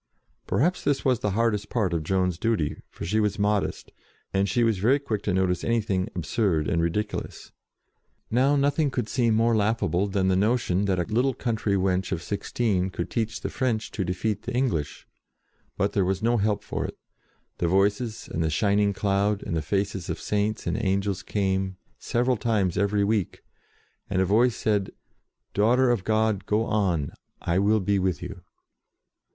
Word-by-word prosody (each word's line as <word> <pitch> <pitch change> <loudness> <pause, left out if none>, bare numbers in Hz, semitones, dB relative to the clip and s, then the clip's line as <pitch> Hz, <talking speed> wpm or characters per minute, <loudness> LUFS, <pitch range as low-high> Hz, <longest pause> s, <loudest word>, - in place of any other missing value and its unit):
Perhaps 175 +7 +1
this 145 -1 0
was 130 -4 +3
the 105 - -1
hardest 110 -3 +1
part 100 -7 0
of 85 - 0
Joan's 90 +1 0
duty, 110 -10 0
for - - -7
she 105 +6 +1
was 105 -1 +1
modest, 105 -1 -1 0.4
and 100 0 +1
she 120 +7 +2
was 115 -4 +2
very 120 +8 +4
quick 115 -8 -3
to 100 - -1
notice 90 -1 +1
anything 105 -4 0
absurd 85 -1 0
and 85 - +1
ridiculous. 105 +6 -3 0.8
Now 130 +5 +3
nothing 145 +2 +2
could 125 -4 -2
seem 115 -2 +2
more 115 +1 +3
laughable 105 -3 +1
than 95 -1 0
the 95 - +3
notion 100 -2 +1
that 95 -2 +1
a 90 - +1
little 120 +6 +1
country 110 -4 -1
wench 95 0 0
of 90 -3 -2
sixteen 100 -2 -1
could 85 -1 -5
teach 115 -1 -2
the - - -3
French 115 -4 -1
to 100 - -2
defeat 95 +3 -2
the 125 - -5
English. 90 - -1 0.7
But 100 +1 0
there 100 - +2
was 95 +2 -1
no 120 +1 +3
help 105 -1 0
for - - -3
it. - - -6 0.6
The 85 - +1
Voices, 100 +5 +1
and 80 - -3
the 80 - +1
shining 100 +5 +2
cloud, 100 +1 0
and 85 - -3
the 80 - 0
faces 95 +2 -2
of - - -3
Saints 105 +1 -1
and 115 - -1
angels 100 0 0
came, 95 -2 -1 0.2
several 125 +1 +1
times 105 -6 0
every 100 0 +1
week, 105 -2 -1 0.7
and 95 -2 0
a 95 - +3
Voice 110 +5 +3
said, 105 -3 0 0.6
"Daughter 120 +5 +3
of 115 -6 0
God, 110 -2 +1
go 110 +2 +1
on! 90 -11 0 0.3
I 85 +2 0
will 105 +2 +3
be 100 +1 +1
with 90 -5 -1
you." - - -7
100 Hz, 180 wpm, -26 LUFS, 95-115 Hz, 0.8 s, very